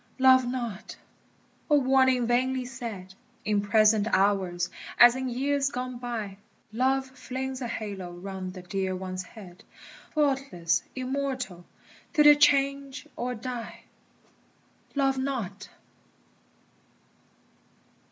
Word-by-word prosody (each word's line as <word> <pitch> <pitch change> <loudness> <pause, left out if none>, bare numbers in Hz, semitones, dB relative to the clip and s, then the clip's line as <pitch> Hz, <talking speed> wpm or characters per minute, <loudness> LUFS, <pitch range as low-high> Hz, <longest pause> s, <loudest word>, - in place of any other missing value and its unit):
Love 260 -1 +6
not! 235 -5 -5 0.7
O 295 - +6
warning 260 -2 +3
vainly 255 +2 +1
said 230 -7 -7 0.3
In 210 -1 +2
present 215 +1 +4
hours 190 -3 +2 0.3
as 240 0 +8
in 260 0 -2
years 275 +3 0
gone 250 -1 -5
by! 225 -5 -4 0.4
Love 265 +3 +1
flings 260 0 -5
a 245 - -2
halo 200 -5 -5
round 185 +1 -7
the 185 - -8
dear 190 +1 -2
one's 185 0 -4
head, 180 -1 -13 0.5
Faultless, 270 - 0
immortal, 255 -8 -3 0.5
till 305 -3 +5
they 295 0 +10
change 275 -1 +2
or 250 +1 -3
die. 240 0 -6 1.1
Love 270 -1 +2
not! 215 -7 -4
245 Hz, 105 wpm, -27 LUFS, 200-265 Hz, 1.1 s, they